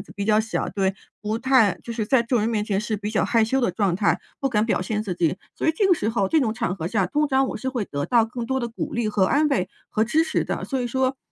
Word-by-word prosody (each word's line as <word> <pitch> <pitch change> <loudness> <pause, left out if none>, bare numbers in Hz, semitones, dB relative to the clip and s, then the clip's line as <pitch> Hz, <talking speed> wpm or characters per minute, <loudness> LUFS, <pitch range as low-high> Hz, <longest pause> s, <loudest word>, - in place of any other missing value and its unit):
胆 - - -5
子 195 - -15
比 200 - -2
较 215 +1 +4
小， 220 0 -2
对 195 -1 -1 0.3
不 215 +1 -2
太 250 -7 +3
就 235 - -5
是 225 -2 -2
在 235 +2 +3
众 240 0 +1
人 215 - +1
面 215 -3 0
前 200 -2 0
是 215 0 -2
比 205 +1 -4
较 215 - +2
害 230 -2 +3
羞 265 +5 0
的 240 - +1
状 190 0 0
态， 200 +3 +1 0.2
不 275 - +1
敢 215 -3 +1
表 215 - +1
现 210 +3 -2
自 190 -4 -3
己。 175 0 0 0.2
所 - - -1
以 - - +7
这 400 - +3
个 375 - +5
时 215 - -2
候 220 -4 +1
这 320 - +3
种 230 -5 +1
场 225 -5 -2
合 165 -3 -4
下， 195 -2 +1
通 295 +10 0
常 265 0 +2
我 - - -4
是 260 - -4
会 250 -5 -2
得 145 -5 -3
到 235 -2 +4
更 235 +1 -5
多 265 +2 0
地 240 - -2
鼓 230 - -5
励 235 -2 0
和 205 -2 +2
安 295 +9 +3
慰 210 -10 0 0.2
和 215 - 0
支 310 +8 +2
持 - - 0
的。 - - -3
所 265 -2 -2
以 245 - -1
说 260 +2 0
225 Hz, 330 characters per minute, -23 LUFS, 205-260 Hz, 0.3 s, 以